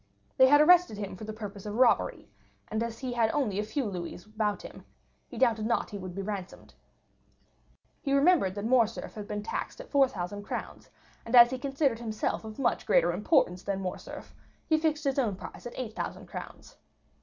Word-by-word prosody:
They 260 Hz, -1 st, +8 dB
had 290 Hz, +2 st, +7 dB
arrested 350 Hz, -, +5 dB
him 200 Hz, -2 st, -5 dB
for 215 Hz, -, -8 dB
the 215 Hz, -, -5 dB
purpose 205 Hz, -2 st, -8 dB
of 205 Hz, -, -4 dB
robbery, 245 Hz, 0 st, +2 dB, 0.4 s
and 220 Hz, +1 st, -2 dB
as 230 Hz, -1 st, -3 dB
he 255 Hz, 0 st, -4 dB
had 230 Hz, -2 st, +2 dB
only 220 Hz, -9 st, 0 dB
a -, -, 0 dB
few 265 Hz, +5 st, -2 dB
louis 180 Hz, -2 st, -6 dB
about 215 Hz, -1 st, -2 dB
him, -, -, -11 dB, 0.4 s
he -, -, -10 dB
doubted 225 Hz, -4 st, +2 dB
not 235 Hz, -, 0 dB
he 205 Hz, -, -5 dB
would 185 Hz, -2 st, -7 dB
be 195 Hz, -, -3 dB
ransomed. 195 Hz, -2 st, -6 dB, 1.3 s
He 275 Hz, -, -2 dB
remembered 275 Hz, -, +4 dB
that 205 Hz, +1 st, -4 dB
Morcerf 230 Hz, -2 st, +1 dB
had 210 Hz, -1 st, -7 dB
been 210 Hz, -1 st, -4 dB
taxed 225 Hz, -, -4 dB
at -, -, -10 dB
4,000 205 Hz, -9 st, +1 dB
crowns, 205 Hz, -, -6 dB, 0.3 s
and 230 Hz, -, -1 dB
as 240 Hz, 0 st, +9 dB
he 260 Hz, -, -3 dB
considered 270 Hz, -3 st, 0 dB
himself 220 Hz, -2 st, -2 dB
of 220 Hz, -1 st, -9 dB
much 240 Hz, -5 st, 0 dB
greater 175 Hz, +1 st, +4 dB
importance 185 Hz, -, +2 dB
than 195 Hz, -1 st, -2 dB
Morcerf 185 Hz, -2 st, -7 dB, 0.3 s
he 315 Hz, -2 st, +2 dB
fixed 310 Hz, -1 st, 0 dB
his 275 Hz, -1 st, 0 dB
own 220 Hz, -7 st, 0 dB
price 210 Hz, -, -9 dB
at 240 Hz, -, -10 dB
8,000 230 Hz, -4 st, -5 dB
crowns. -, -, -10 dB
220 Hz, 190 wpm, -29 LUFS, 205-265 Hz, 1.3 s, as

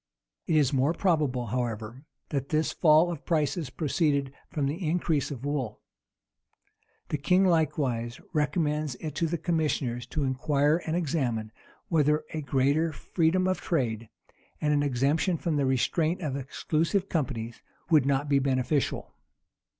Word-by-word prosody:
It 165 Hz, -, +2 dB
is 145 Hz, -3 st, +3 dB
more 135 Hz, +4 st, +2 dB
probable, 150 Hz, -10 st, +1 dB
however, 115 Hz, +2 st, -4 dB, 0.2 s
that 140 Hz, -1 st, -2 dB
this 155 Hz, 0 st, +1 dB
fall 160 Hz, +1 st, +5 dB
of 165 Hz, -, -6 dB
prices 155 Hz, -2 st, 0 dB
proceeded 140 Hz, -2 st, 0 dB, 0.2 s
from 150 Hz, -6 st, -1 dB
the 155 Hz, +7 st, -3 dB
increase 160 Hz, -3 st, 0 dB
of 135 Hz, -2 st, -6 dB
wool. 135 Hz, -7 st, -2 dB, 1.3 s
The 150 Hz, -, -1 dB
king 180 Hz, +7 st, +3 dB
likewise 135 Hz, -8 st, 0 dB
recommends 150 Hz, -2 st, 0 dB
it 155 Hz, +3 st, -6 dB
to 165 Hz, +3 st, 0 dB
the 170 Hz, +2 st, -1 dB
commissioners 150 Hz, -7 st, -1 dB
to 150 Hz, -, -2 dB
inquire 145 Hz, +3 st, +2 dB
and 160 Hz, -, 0 dB
examine, 130 Hz, -10 st, -1 dB, 0.4 s
whether 150 Hz, -2 st, +2 dB
a 155 Hz, -, -2 dB
greater 140 Hz, +4 st, +1 dB
freedom 170 Hz, +4 st, +1 dB
of 185 Hz, -, 0 dB
trade, 115 Hz, -8 st, -1 dB, 0.5 s
and 150 Hz, -1 st, +1 dB
an 145 Hz, -, +3 dB
exemption 145 Hz, +6 st, +1 dB
from 160 Hz, -1 st, -1 dB
the 140 Hz, -2 st, +1 dB
restraint 155 Hz, +7 st, +1 dB
of 145 Hz, -5 st, -2 dB
exclusive 160 Hz, +7 st, -1 dB
companies, 120 Hz, -7 st, -3 dB, 0.3 s
would 150 Hz, -4 st, +5 dB
not 140 Hz, +1 st, +1 dB
be 140 Hz, -1 st, +3 dB
beneficial. 135 Hz, +1 st, 0 dB
150 Hz, 140 wpm, -28 LUFS, 130-160 Hz, 1.3 s, fall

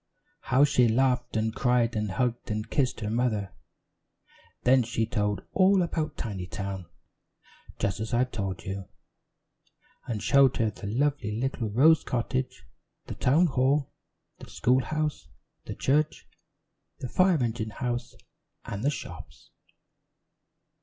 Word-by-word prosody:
How 135 Hz, -2 st, +3 dB
she 125 Hz, -4 st, +4 dB
laughed 125 Hz, 0 st, +1 dB
and 110 Hz, 0 st, 0 dB
cried 120 Hz, -2 st, +1 dB
and 105 Hz, -1 st, -1 dB
hugged 120 Hz, +2 st, -1 dB
and 105 Hz, 0 st, -3 dB
kissed 130 Hz, -4 st, 0 dB
her 105 Hz, -, -2 dB
mother. 110 Hz, -4 st, -1 dB, 1.1 s
Then 130 Hz, +1 st, +5 dB
she 115 Hz, -1 st, -1 dB
told 105 Hz, -4 st, -1 dB
all 190 Hz, -1 st, +4 dB
about 160 Hz, -2 st, -3 dB
Tinytown 95 Hz, -3 st, -5 dB, 0.9 s
just 100 Hz, -1 st, -1 dB
as 110 Hz, +1 st, -4 dB
I've 125 Hz, +1 st, +1 dB
told 95 Hz, -5 st, -4 dB
you, 95 Hz, 0 st, -5 dB, 1.2 s
and 110 Hz, -4 st, -3 dB
showed 140 Hz, -2 st, +4 dB
her 110 Hz, -2 st, +1 dB
the 105 Hz, -, -8 dB
lovely 115 Hz, -2 st, 0 dB
little 125 Hz, -3 st, -2 dB
Rose 150 Hz, +9 st, +5 dB
Cottage, 125 Hz, +1 st, -2 dB, 0.4 s
the -, -, -6 dB
town 150 Hz, +8 st, +3 dB
hall, 135 Hz, -1 st, +1 dB, 0.5 s
the -, -, -11 dB
school 130 Hz, +2 st, +2 dB
house, 155 Hz, -, -2 dB, 0.4 s
the -, -, -6 dB
church, 150 Hz, +3 st, 0 dB, 0.7 s
the 130 Hz, -, -5 dB
fire 185 Hz, +6 st, +3 dB
engine 115 Hz, -4 st, -2 dB
house 120 Hz, +1 st, -4 dB, 0.5 s
and 100 Hz, +2 st, -5 dB
the 140 Hz, -, +3 dB
shops. 140 Hz, -, -8 dB
120 Hz, 130 wpm, -27 LUFS, 110-135 Hz, 1.2 s, Then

